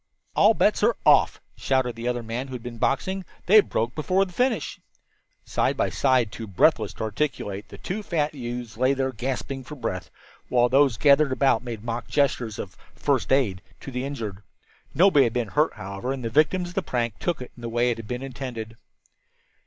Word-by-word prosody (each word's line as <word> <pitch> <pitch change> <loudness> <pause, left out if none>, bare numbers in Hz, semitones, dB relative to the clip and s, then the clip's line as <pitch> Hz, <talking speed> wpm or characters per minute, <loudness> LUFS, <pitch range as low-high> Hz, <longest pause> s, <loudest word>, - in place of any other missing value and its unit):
"All - - +5
bets - - +2
are - - +3
off," - - +5 0.2
shouted 130 -3 0
the 115 +1 -5
other 120 -1 -1
man 115 +4 -4
who 130 - -9
had 125 -2 -6
been 120 -2 -7
boxing; 190 +11 0 0.2
"they 210 +3 +8
broke 115 - -2
before 185 +5 +1
the 180 - -12
finish." 245 - 0 0.7
Side - - 0
by - - +1
side, 125 -5 +2
too 115 +1 -7
breathless 105 - +3
to - - -6
articulate, 105 -4 -3
the - - -10
two 200 +4 -4
fat 155 -6 -1
youths 120 -4 -6
lay 130 +3 +3
there 135 0 0
gasping 130 +2 -4
for 150 +4 -9
breath, 115 -8 -4 0.4
while 125 -1 +3
those 135 -2 +4
gathered 145 0 +5
about 130 -3 +3
them - - -18
made 115 -3 -6
mock 120 0 -4
gestures 125 -7 0
of 95 - -7 0.2
"first 140 -4 0
aid 115 -9 +2 0.2
to 135 - -7
the 125 0 -3
injured." 115 -8 -5 0.5
Nobody 155 -4 +6
had 115 - -1
been 120 -4 -1
hurt, 150 +6 +2
however, 100 +6 -5
and 130 -3 -4
the 115 - -2
victims 175 +6 +2
of - - -11
the 195 - 0
prank 120 - -2
took 175 - -1
it 125 - -8
in 120 - -14
the 115 - -4
way 120 +1 +2
it 115 - -3
had 115 -2 -8
been 125 +2 -4
intended. 120 -4 -6
125 Hz, 205 wpm, -25 LUFS, 115-145 Hz, 0.7 s, they